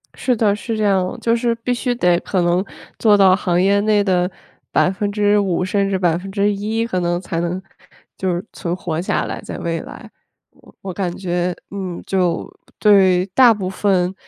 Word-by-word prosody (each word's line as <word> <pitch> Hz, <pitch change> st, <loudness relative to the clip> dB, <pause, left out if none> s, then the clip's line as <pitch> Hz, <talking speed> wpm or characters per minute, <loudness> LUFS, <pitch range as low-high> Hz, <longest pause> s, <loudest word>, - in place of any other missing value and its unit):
是 250 Hz, -, 0 dB
的， 215 Hz, -3 st, +2 dB
是 220 Hz, +3 st, -4 dB
这 215 Hz, -, -1 dB
样。 190 Hz, -3 st, +1 dB
就 230 Hz, 0 st, +2 dB
是 235 Hz, 0 st, 0 dB
必 230 Hz, +2 st, -2 dB
须 245 Hz, +1 st, -1 dB
得 180 Hz, -6 st, +2 dB
可 185 Hz, -, -1 dB
能 175 Hz, +2 st, +2 dB, 0.3 s
做 210 Hz, -2 st, +4 dB
到 190 Hz, -2 st, +6 dB
行 180 Hz, -2 st, 0 dB
业 200 Hz, +2 st, +3 dB
内 210 Hz, -1 st, +2 dB
的 180 Hz, -2 st, +1 dB, 0.4 s
5% 205 Hz, -1 st, +1 dB
甚 195 Hz, +1 st, 0 dB
至 195 Hz, -, 0 dB
1%， 200 Hz, +5 st, 0 dB
可 185 Hz, -6 st, -2 dB
能 175 Hz, 0 st, 0 dB
才 170 Hz, -3 st, -3 dB
能 175 Hz, +2 st, -2 dB, 0.6 s
就 185 Hz, -1 st, -1 dB
是 175 Hz, +2 st, -3 dB
存 170 Hz, 0 st, -3 dB
活 165 Hz, -3 st, -4 dB
下 180 Hz, -, -1 dB
来， -, -, -5 dB
在 -, -, -7 dB
未 165 Hz, -1 st, -2 dB
来。 -, -, -11 dB, 0.4 s
我 -, -, -21 dB
我 190 Hz, -1 st, -6 dB
感 180 Hz, -2 st, -3 dB
觉， 175 Hz, -1 st, -2 dB, 0.2 s
嗯， 190 Hz, -3 st, -5 dB
就 180 Hz, -3 st, -1 dB, 0.3 s
对 190 Hz, -4 st, +4 dB
大 235 Hz, +5 st, +5 dB
部 195 Hz, -4 st, -4 dB
分 190 Hz, -2 st, +1 dB
190 Hz, 180 characters per minute, -19 LUFS, 180-205 Hz, 0.6 s, 到